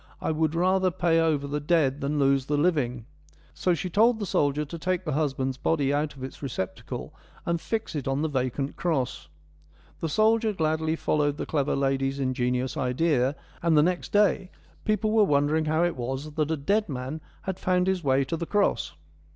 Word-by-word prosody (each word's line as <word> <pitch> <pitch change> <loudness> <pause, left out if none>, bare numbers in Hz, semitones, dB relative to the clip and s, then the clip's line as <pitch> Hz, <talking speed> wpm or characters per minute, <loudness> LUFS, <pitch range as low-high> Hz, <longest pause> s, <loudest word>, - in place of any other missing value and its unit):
I - - -1
would 160 0 0
rather 185 +2 +3
pay 170 -1 +2
over 155 -3 +1
the 145 +1 -2
dead 145 -3 +1
than 145 +2 -1
lose 135 -1 +2
the 145 - +1
living.' 140 -8 +1 0.5
So 180 -2 +1
she 170 - -3
told 220 +6 +4
the 210 - -3
soldier 150 -3 +1
to 165 +3 -8
take 185 +2 -1
the 155 - -1
husband's 135 -3 -1
body 140 -1 +1
out 150 0 -1
of 130 - -9
its 130 - -8
receptacle 120 -9 -5 0.3
and 170 -1 -1
fix 225 -4 -3
it 145 -4 -3
on 135 +2 0
the - - +2
vacant 135 0 -2
cross. 155 -8 -1 0.4
' 75 +1 -30
The 165 - -1
soldier 220 +4 +3
gladly 160 -2 0
followed 145 -2 0
the - - -3
clever 145 -2 0
lady's 135 0 0
ingenious 130 -1 -1
idea, 130 +1 +1 0.3
and 165 -2 +3
the 150 - +6
next 180 +1 -1
day 200 -2 +3 0.4
people 215 0 +1
were 220 -1 +5
wondering 150 -1 +2
how 155 +2 +2
it 175 -1 +1
was 130 +4 -4
that 150 0 -1
a 160 - 0
dead 200 +8 0
man 135 +3 -4 0.2
had 190 -1 -4
found 180 0 +2
his 190 -2 0
way 135 -1 +3
to 165 - -2
the 165 0 -4
cross.' 205 -1 +1
150 Hz, 195 wpm, -26 LUFS, 135-175 Hz, 0.5 s, the